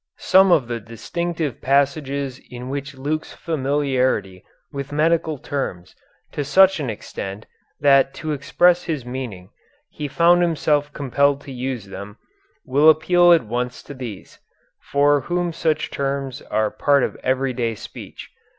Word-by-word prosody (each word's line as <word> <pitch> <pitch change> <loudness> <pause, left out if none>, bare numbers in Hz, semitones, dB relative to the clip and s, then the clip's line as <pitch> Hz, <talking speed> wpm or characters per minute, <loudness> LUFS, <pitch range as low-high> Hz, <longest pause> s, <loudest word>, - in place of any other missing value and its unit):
Some 190 0 +5
of 140 -8 +4
the 120 -1 -3
distinctive 150 +7 -4
passages 140 -1 0
in 125 +1 -8
which 140 0 -5
Luke's 150 +4 -3
familiarity 130 - -1 0.3
with 140 0 -5
medical 155 +1 +1
terms 110 -11 -5 0.4
to 145 - -3
such 190 +6 +5
an 140 -5 -2
extent 100 -1 -6 0.4
that 135 -1 +5
to 155 -2 -4
express 175 +5 +2
his 150 -7 -3
meaning 120 -7 -6 0.4
he 150 - -5
found 170 +5 +4
himself 150 -3 +1
compelled 140 0 +1
to 140 - -10
use 125 -3 -4
them, 100 +1 -9 0.5
will 145 +2 +5
appeal 175 +3 +5
at 170 -4 +5
once 125 +2 -3
to - - -9
these, 120 -8 -9 0.4
for 145 0 +2
whom 175 +1 -2
such 160 -1 -1
terms 135 -2 -3
are 110 -1 +1
part 140 -2 +2
of - - -2
everyday 130 -3 -1
speech. - - -10
140 Hz, 140 wpm, -21 LUFS, 125-155 Hz, 0.5 s, Some